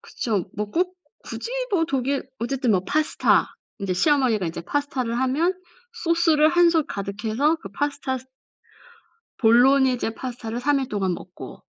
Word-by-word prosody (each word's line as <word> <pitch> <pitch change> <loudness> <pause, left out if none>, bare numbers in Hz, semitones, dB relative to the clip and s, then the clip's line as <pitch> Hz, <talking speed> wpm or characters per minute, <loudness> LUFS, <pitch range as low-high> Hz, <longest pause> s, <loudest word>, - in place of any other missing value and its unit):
그쵸. 210 -7 -2
뭐 210 +1 -2
꼭 365 - -1 0.3
굳이 470 - -6 0.2
뭐 355 -5 +2
독일 270 -1 -1
어쨌든 250 0 0
뭐 185 - +3
파스타 305 +8 +1 0.2
인제 195 -3 -2
시어머니가 250 - +2
인제 165 - -6
파스타를 255 -1 -2
하면 285 +8 +1 0.5
소스를 330 -2 +4
1 350 +1 +5
솥 325 -3 +1
가득해서 215 +10 -1
그 195 - -10
파스타 280 +2 -2
스 260 - -17 1.1
볼로니제 250 0 +4
파스타를 240 -2 -5
3 285 +1 +2
일 265 - -3
동안 195 -3 0
먹고. - - -11
260 Hz, 290 characters per minute, -23 LUFS, 225-300 Hz, 1.1 s, 1